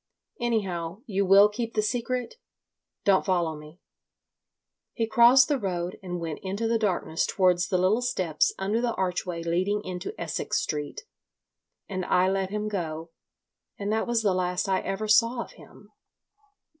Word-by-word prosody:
"Anyhow, 195 Hz, -5 st, -2 dB
you 200 Hz, -3 st, -1 dB
will 200 Hz, +2 st, +8 dB
keep 230 Hz, +2 st, -5 dB
the 215 Hz, -, +2 dB
secret?.... 245 Hz, +2 st, -2 dB, 0.7 s
Don't 195 Hz, -2 st, +4 dB
follow 175 Hz, -4 st, 0 dB
me." 150 Hz, +3 st, -13 dB, 1.1 s
He 230 Hz, -, 0 dB
crossed 240 Hz, +3 st, +6 dB
the 290 Hz, -3 st, 0 dB
road 180 Hz, -4 st, -3 dB
and 180 Hz, -2 st, -5 dB
went 165 Hz, -3 st, -5 dB
into 200 Hz, +4 st, -2 dB
the 230 Hz, 0 st, +1 dB
darkness 180 Hz, -6 st, 0 dB
towards 180 Hz, -2 st, +2 dB
the 185 Hz, -, +1 dB
little 190 Hz, +6 st, +2 dB
steps 185 Hz, -10 st, +1 dB
under 205 Hz, +4 st, -1 dB
the 240 Hz, -1 st, -1 dB
archway 180 Hz, -2 st, -2 dB
leading 185 Hz, +5 st, 0 dB
into 185 Hz, -, -6 dB
Essex -, -, -2 dB
Street, 150 Hz, -, -3 dB, 0.9 s
and 185 Hz, -2 st, -3 dB
I 180 Hz, +1 st, +3 dB
let 195 Hz, -1 st, -1 dB
him 210 Hz, +1 st, -3 dB
go. 165 Hz, -5 st, -4 dB, 0.7 s
And 205 Hz, +1 st, -2 dB
that 220 Hz, -, 0 dB
was 235 Hz, -1 st, +1 dB
the 200 Hz, -3 st, +3 dB
last 180 Hz, 0 st, -1 dB
I 190 Hz, -1 st, +2 dB
ever 200 Hz, +3 st, -3 dB
saw 230 Hz, +3 st, +3 dB
of -, -, -15 dB
him. -, -, -17 dB
195 Hz, 155 wpm, -26 LUFS, 180-220 Hz, 1.1 s, will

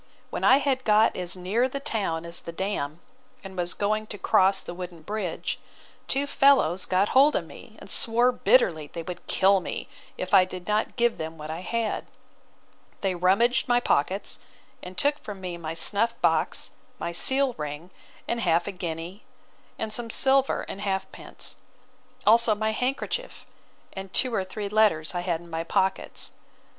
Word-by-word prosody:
When -, -, -4 dB
I 260 Hz, +1 st, +7 dB
had 270 Hz, -2 st, 0 dB
got 215 Hz, 0 st, +4 dB
as 180 Hz, 0 st, -2 dB
near 210 Hz, +8 st, 0 dB
the 275 Hz, -, -4 dB
town 200 Hz, -, -2 dB
as 170 Hz, +1 st, -2 dB
the 170 Hz, -, -7 dB
dam, 170 Hz, -4 st, -3 dB, 0.4 s
and 190 Hz, -1 st, -9 dB
was 175 Hz, -1 st, -1 dB
going 215 Hz, +1 st, 0 dB
to 210 Hz, -, -7 dB
cross 195 Hz, 0 st, +3 dB
the -, -, -7 dB
wooden 175 Hz, -2 st, -8 dB
bridge, 205 Hz, -3 st, -3 dB, 0.5 s
two 275 Hz, +1 st, +1 dB
fellows 270 Hz, -, +3 dB
got 190 Hz, +2 st, +2 dB
hold 280 Hz, +3 st, +5 dB
of -, -, 0 dB
me, -, -, -13 dB
and -, -, -12 dB
swore 240 Hz, +2 st, +3 dB
bitterly 170 Hz, -, +3 dB
they 165 Hz, -, -6 dB
would 175 Hz, +1 st, -8 dB
kill 195 Hz, +1 st, +4 dB
me, 180 Hz, -, -5 dB, 0.3 s
if 185 Hz, -, -5 dB
I 190 Hz, -2 st, +8 dB
did 185 Hz, -1 st, -8 dB
not 210 Hz, +1 st, 0 dB
give 235 Hz, -1 st, +1 dB
them 160 Hz, +1 st, -5 dB
what 155 Hz, 0 st, -6 dB
I 160 Hz, -, -4 dB
had. 225 Hz, +3 st, -2 dB, 0.9 s
They 195 Hz, -2 st, 0 dB
rummaged 195 Hz, +8 st, +2 dB
my 245 Hz, -1 st, +4 dB
pockets, 190 Hz, -2 st, +1 dB, 0.4 s
and 180 Hz, +1 st, -9 dB
took 290 Hz, +1 st, +2 dB
from 205 Hz, -2 st, -8 dB
me 180 Hz, -2 st, -5 dB
my 165 Hz, -1 st, -5 dB
snuff 210 Hz, +7 st, +1 dB
box, -, -, +1 dB, 0.3 s
my 170 Hz, -, -3 dB
seal 265 Hz, +8 st, +1 dB
ring, 150 Hz, +4 st, -6 dB, 0.4 s
and 235 Hz, -, -1 dB
half 170 Hz, -5 st, +2 dB
a 200 Hz, -, -3 dB
guinea, 175 Hz, +2 st, -6 dB, 0.6 s
and 220 Hz, -1 st, -3 dB
some 230 Hz, +1 st, 0 dB
silver, 270 Hz, +3 st, +3 dB
and 200 Hz, -, -7 dB
halfpence; 195 Hz, -1 st, -4 dB, 0.7 s
also 225 Hz, 0 st, +5 dB
my 220 Hz, +1 st, 0 dB
handkerchief, 270 Hz, -, -3 dB, 0.5 s
and 190 Hz, 0 st, -7 dB
two 255 Hz, -2 st, +3 dB
or 195 Hz, -, +1 dB
three 200 Hz, +2 st, -5 dB
letters 200 Hz, -7 st, +2 dB
I 175 Hz, -, -1 dB
had 175 Hz, -2 st, -1 dB
in 170 Hz, -, -14 dB
my 165 Hz, 0 st, -2 dB
pockets. 190 Hz, +2 st, -1 dB
195 Hz, 170 wpm, -26 LUFS, 175-230 Hz, 0.9 s, I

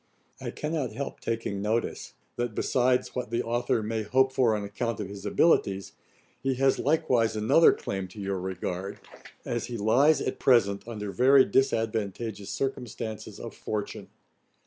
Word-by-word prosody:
I -, -, -5 dB
cannot 150 Hz, -7 st, -3 dB
help 140 Hz, +5 st, -5 dB
taking 115 Hz, -3 st, -3 dB
notice, 110 Hz, +3 st, -2 dB, 0.2 s
that, 120 Hz, -3 st, -3 dB
besides 125 Hz, 0 st, +1 dB
what 125 Hz, -3 st, -3 dB
the 120 Hz, +1 st, -1 dB
authour 120 Hz, -1 st, 0 dB
may 110 Hz, +1 st, -2 dB
hope 130 Hz, +5 st, +2 dB
for 120 Hz, -5 st, +3 dB
on 105 Hz, -, -3 dB
account 110 Hz, +2 st, -3 dB
of 100 Hz, -3 st, -4 dB
his 100 Hz, -1 st, -7 dB
abilities, 100 Hz, -, +2 dB, 0.5 s
he 135 Hz, 0 st, 0 dB
has 135 Hz, +1 st, +2 dB
likewise 125 Hz, -6 st, +2 dB
another 110 Hz, +10 st, +5 dB
claim 95 Hz, -1 st, -4 dB
to 105 Hz, -, -12 dB
your 100 Hz, -1 st, -2 dB
regard, 95 Hz, +1 st, -4 dB, 0.5 s
as 120 Hz, -1 st, -2 dB
he 120 Hz, -, -5 dB
lies 130 Hz, +9 st, +4 dB
at 130 Hz, -, -3 dB
present 110 Hz, -5 st, +3 dB
under 105 Hz, -3 st, -5 dB
very 130 Hz, +4 st, +6 dB
disadvantageous 110 Hz, -4 st, -1 dB
circumstances 115 Hz, -5 st, -4 dB
of -, -, -7 dB
fortune. 105 Hz, -1 st, -5 dB
115 Hz, 150 wpm, -28 LUFS, 100-130 Hz, 0.5 s, very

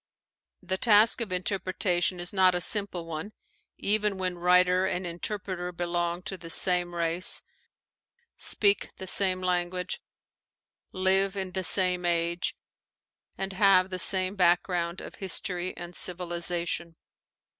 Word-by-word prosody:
The 185 Hz, +1 st, -2 dB
task 225 Hz, +1 st, +5 dB
of 220 Hz, -5 st, -4 dB
inter 185 Hz, +2 st, -1 dB
pretation 180 Hz, -1 st, 0 dB
is 175 Hz, +4 st, -3 dB
not 185 Hz, -2 st, +4 dB
a -, -, 0 dB
simple 190 Hz, -3 st, +1 dB
one, 165 Hz, +6 st, -6 dB, 0.4 s
even 210 Hz, -1 st, 0 dB
when 185 Hz, -2 st, -3 dB
writer 180 Hz, +1 st, +4 dB
and 185 Hz, -1 st, -2 dB
inter 175 Hz, +5 st, -4 dB
preter 180 Hz, -2 st, -5 dB
belong 175 Hz, 0 st, -2 dB
to 190 Hz, -, -5 dB
the 165 Hz, -, -10 dB
same 175 Hz, 0 st, +2 dB
race, 170 Hz, +2 st, 0 dB, 0.9 s
speak 200 Hz, -2 st, +2 dB
the 190 Hz, -, -7 dB
same 185 Hz, 0 st, 0 dB
language, 180 Hz, 0 st, -2 dB, 0.9 s
live 190 Hz, +1 st, +2 dB
in 190 Hz, -1 st, -3 dB
the 190 Hz, 0 st, -2 dB
same 180 Hz, -1 st, +3 dB
age, 170 Hz, 0 st, 0 dB, 0.8 s
and 195 Hz, 0 st, -4 dB
have 190 Hz, -1 st, +4 dB
the 185 Hz, -, -3 dB
same 185 Hz, +2 st, +2 dB
background 175 Hz, -1 st, +1 dB
of -, -, -9 dB
history 185 Hz, -1 st, -2 dB
and 175 Hz, 0 st, -9 dB
civilization. 175 Hz, -1 st, -3 dB
180 Hz, 135 wpm, -28 LUFS, 175-190 Hz, 0.9 s, task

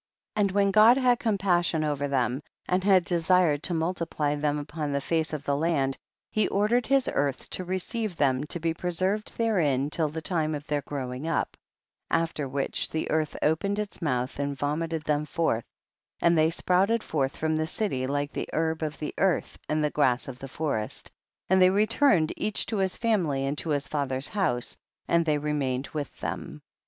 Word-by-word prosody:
56. 210 Hz, -, +2 dB
And 200 Hz, -2 st, +2 dB
when 200 Hz, -1 st, +4 dB
God 220 Hz, +5 st, +7 dB
had 250 Hz, -3 st, +3 dB
compas 195 Hz, -5 st, +2 dB
sion 160 Hz, -2 st, 0 dB
over 145 Hz, -2 st, -1 dB
ihem 130 Hz, 0 st, 0 dB, 0.3 s
and 185 Hz, +1 st, +1 dB
had 190 Hz, -3 st, +5 dB
desired 175 Hz, -3 st, +3 dB
to 175 Hz, -, -1 dB
multiply 165 Hz, -3 st, -1 dB
them 150 Hz, 0 st, 0 dB
upon 150 Hz, 0 st, -4 dB
the 140 Hz, -, +1 dB
face 160 Hz, +3 st, -1 dB
of 150 Hz, -2 st, -4 dB
the 140 Hz, -1 st, 0 dB
land, 140 Hz, -3 st, +1 dB, 0.4 s
he 215 Hz, -, +2 dB
ordered 220 Hz, +4 st, +1 dB
his 270 Hz, -1 st, +3 dB
earth 140 Hz, -1 st, -1 dB
to 185 Hz, -, -2 dB
receive 190 Hz, +3 st, -2 dB
them 135 Hz, -3 st, +2 dB
to 170 Hz, -, -3 dB
be 165 Hz, 0 st, 0 dB
preserved 185 Hz, +5 st, -1 dB
therein 150 Hz, -, +1 dB
till 155 Hz, -2 st, +1 dB
the 160 Hz, +2 st, -5 dB
time 155 Hz, -4 st, 0 dB
of 145 Hz, 0 st, -7 dB
their 145 Hz, -1 st, -1 dB
growing 135 Hz, 0 st, -5 dB
up, 165 Hz, -, -1 dB, 0.5 s
after 160 Hz, -4 st, 0 dB
whicii 135 Hz, +1 st, -1 dB
the 160 Hz, -, -2 dB
earth 155 Hz, -1 st, 0 dB
opened 160 Hz, +7 st, +1 dB
its 210 Hz, -2 st, -4 dB
mouth 130 Hz, -4 st, -1 dB
and 140 Hz, -1 st, -2 dB
vomited 155 Hz, +3 st, -2 dB
them 150 Hz, -1 st, +1 dB
forth 150 Hz, -8 st, 0 dB, 0.6 s
andt 170 Hz, 0 st, +5 dB
they 160 Hz, 0 st, +4 dB
sprout 180 Hz, +3 st, +2 dB
ed 230 Hz, -1 st, +1 dB
forth 135 Hz, -3 st, -1 dB
from 160 Hz, 0 st, 0 dB
the 155 Hz, 0 st, 0 dB
city 145 Hz, -9 st, -2 dB
like 145 Hz, +1 st, -2 dB
ihe -, -, -3 dB
herb 160 Hz, 0 st, 0 dB
of 155 Hz, -1 st, -3 dB
the 150 Hz, -, -4 dB
earth 190 Hz, -2 st, +1 dB
and 155 Hz, 0 st, +1 dB
tiie 150 Hz, -, -2 dB
grass 130 Hz, -4 st, +2 dB
of 130 Hz, -2 st, -7 dB
the 135 Hz, -, -7 dB
forest, 135 Hz, -7 st, -3 dB, 0.4 s
and 190 Hz, 0 st, +4 dB
they 185 Hz, -, +7 dB
returned 205 Hz, -, +3 dB
each 215 Hz, -, -1 dB
to 220 Hz, -, -3 dB
his 190 Hz, -1 st, 0 dB
family 170 Hz, -, +1 dB
and 140 Hz, +2 st, -1 dB
to 160 Hz, -, -4 dB
his 145 Hz, -1 st, 0 dB
father's 135 Hz, -2 st, -1 dB
house, 125 Hz, -, 0 dB, 0.3 s
and 170 Hz, -1 st, +2 dB
they 150 Hz, -1 st, +3 dB
remained 145 Hz, -3 st, -1 dB
with 150 Hz, -3 st, -4 dB
them. -, -, -5 dB
160 Hz, 195 wpm, -27 LUFS, 145-185 Hz, 0.6 s, God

